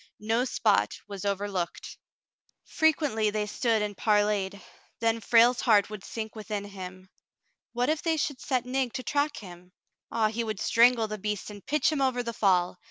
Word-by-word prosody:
No 225 +4 0
spot 105 - +1
was 200 -1 -7
over 200 0 -1
looked. 180 -4 -4 0.7
Frequently 290 -9 +1
they 210 0 -1
stood 220 +1 0
and 205 -1 -4
parleyed. 205 -2 +1 0.4
Then 230 0 +1
Frale's 235 +3 +4
heart 210 -3 +3
would 210 -2 -7
sink 220 -1 -6
within 210 -1 -4
him. 185 -2 -9 0.7
What 245 +1 0
if 310 0 0
they 325 -1 0
should 285 -3 -2
set 255 -3 -1
Nig 255 -1 -1
to 255 - -4
track 290 +1 0
him! 180 -2 -12 0.4
Ah, 225 -2 +2
he 230 +2 -2
would 215 -3 -4
strangle 235 -1 +4
the 215 0 -6
beast 210 +1 -3
and 205 -2 -11
pitch 300 +1 +1
him 300 -3 -1
over 255 -2 +1
the 235 -1 -4
fall. 180 -4 +2
220 Hz, 175 wpm, -28 LUFS, 205-250 Hz, 0.7 s, Frale's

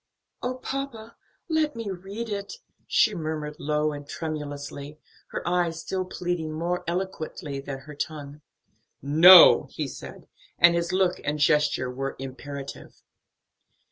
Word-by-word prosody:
"Oh, 250 +1 -2
papa, 255 -4 -6 0.3
let 315 -4 0
me 225 -3 -4
read 195 +5 -6
it!" 200 -1 -4 0.3
she 215 - +3
murmured 155 -3 -4
low 150 +1 0
and 145 -1 -8
tremulously, 145 -2 -6 0.3
her - - -5
eyes 175 -2 0
still 185 +2 -3
pleading 175 -3 -3
more 170 +3 -2
eloquently 170 -5 -4
than 135 0 -6
her 150 +2 -11
tongue. 145 0 -6 0.6
"No," 165 +5 +9
he - - -4
said, - - -10 0.3
and 170 0 +6
his 170 +1 -1
look 185 -1 +1
and 150 +1 -1
gesture 150 -3 +2
were 135 +2 -4
imperative. 135 +1 -8
160 Hz, 130 wpm, -26 LUFS, 145-185 Hz, 0.6 s, No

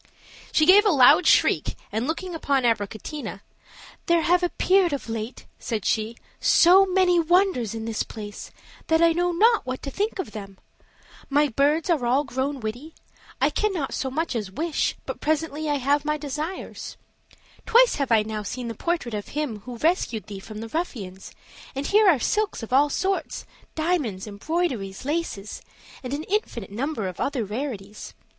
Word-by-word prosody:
She 310 - +4
gave 395 +5 +8
a 425 - +3
loud 275 +3 +6
shriek, - - +3 0.2
and 225 +4 -2
looking 350 +3 -3
upon 280 -5 0
Abricotina, 220 +1 -2 0.7
"There 340 -1 +3
have 355 +2 +3
appeared 360 -1 +2
of 280 - -4
late," 225 +1 -5
said 220 -5 -3
she, 220 +1 0 0.2
"so 375 +3 +6
many 365 -2 +3
wonders 335 - +2
in 220 0 -5
this 225 -1 -2
place, 205 -2 -7 0.4
that 320 0 +3
I 335 0 +5
know 350 +1 +1
not 445 +6 +4
what 255 0 -5
to 275 - -5
think 415 +6 -2
of 375 - -4
them: 195 -3 -9 0.7
my 290 +1 +3
birds 290 +6 +1
are 325 -8 +1
all 255 +4 +2
grown 265 0 -3
witty; 245 +9 -6 0.4
I - - +3
cannot 380 -10 -1
so 265 - -2
much 315 +2 -2
as 210 -4 -3
wish, 310 - -1
but - - -6
presently 310 0 -1
I 290 - +2
have 285 +2 +1
my 300 0 0
desires; 300 +5 -6 0.7
twice 475 +2 +5
have 275 -4 -1
I 220 -2 +5
now 215 0 -4
seen 235 +4 -5
the - - -4
portrait 335 -2 -2
of 205 -1 -4
him 285 -8 -3
who 250 -1 -7
rescued 305 - 0
thee 200 -2 -8
from 215 +2 -9
the 225 - -7
ruffians; 210 - -5 0.4
and 275 +1 -3
here 420 +2 +5
are 325 - +5
silks 420 - -1
of 225 - -6
all 285 +3 +5
sorts, 385 +6 -2 0.3
diamonds, 310 - -1
embroideries, 215 - -3
laces, 290 -10 -3 0.4
and 255 - -6
an 290 +2 -3
infinite 420 - -2
number 235 -1 -2
of 185 - -7
other 265 -6 -1
rarities. 210 -2 -6
285 Hz, 170 wpm, -24 LUFS, 225-335 Hz, 0.7 s, gave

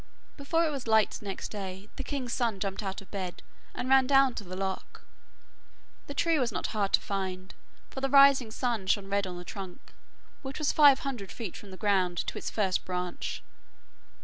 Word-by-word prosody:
Before 325 +4 +1
it 310 - 0
was 275 -5 -5
light 220 -1 +3
next 195 -2 -5
day, 195 -1 -6
the 270 - -4
king's 255 -3 -3
son 230 -6 0
jumped 195 0 -2
out 195 -1 -4
of - - -23
bed 185 -3 -5 0.3
and 250 - -3
ran 265 -1 +5
down 270 -2 +5
to 210 - -6
the 185 -1 -7
loch. 190 0 -4 1.0
The 285 - -6
tree 330 +1 +2
was 245 -3 +1
not - - -3
hard 205 -2 0
to - - +6
find, 190 -2 -4 0.4
for 265 - -6
the 270 - 0
rising 275 -3 +7
sun 225 -4 -2
shone 195 0 +1
red 200 -1 +1
on 180 -1 -6
the 175 - -8
trunk, 190 -2 -9 0.5
which 270 -1 -6
was 305 - +1
five 285 -3 +7
hundred 245 -9 -4
feet 220 -7 -6
from 205 - -10
the 185 - -9
ground 185 -4 +1
to - - -4
its - - -4
first 195 -4 0
branch. 180 -1 -4
210 Hz, 200 wpm, -29 LUFS, 190-270 Hz, 1.0 s, rising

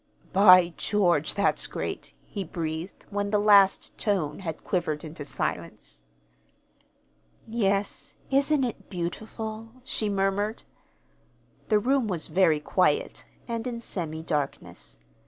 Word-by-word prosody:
"By 185 -3 +7
George, 175 -8 +1
that's 200 - +1
great!" - - -5
he 200 - -5
breathed, 160 +1 -5
when 205 0 -1
the 210 - +2
last 205 -2 +4
tone 190 -8 0
had 165 -5 -6
quivered 155 -5 -1
into 155 -1 -7
silence. 140 - -4 1.5
"Yes, 200 -3 -1 0.2
isn't 280 +1 +3
it 240 -3 -4
beautiful?" 215 +5 -5 0.2
she 215 -4 -1
murmured. 200 +2 0 1.1
The 215 - +5
room 255 +2 +1
was 175 -6 -2
very 170 -4 +4
quiet, 190 - 0 0.2
and 230 0 -3
in 235 -2 -4
semi 160 -8 -5
darkness. 150 - -4
195 Hz, 115 wpm, -27 LUFS, 170-220 Hz, 1.5 s, By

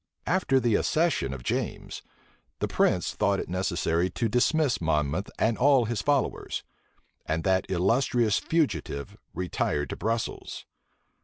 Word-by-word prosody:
After 165 -6 +2
the 120 -3 +1
accession 155 - +1
of 65 -3 -7
James, - - -3 0.6
the - - -1
prince - - +1
thought - - +1
it - - -4
necessary 90 -1 0
to 115 +6 -1
dismiss 125 - +2
Monmouth 80 +3 0
and 110 0 +1
all 135 -2 +5
his 115 -1 -2
followers; 145 +3 -1 0.6
and 80 +1 -1
that 95 -1 +1
illustrious 110 +4 +2
fugitive 95 - -1 0.2
retired 85 -5 -1
to - - -3
Brussels. 115 +3 -3
105 Hz, 130 wpm, -27 LUFS, 85-130 Hz, 0.6 s, all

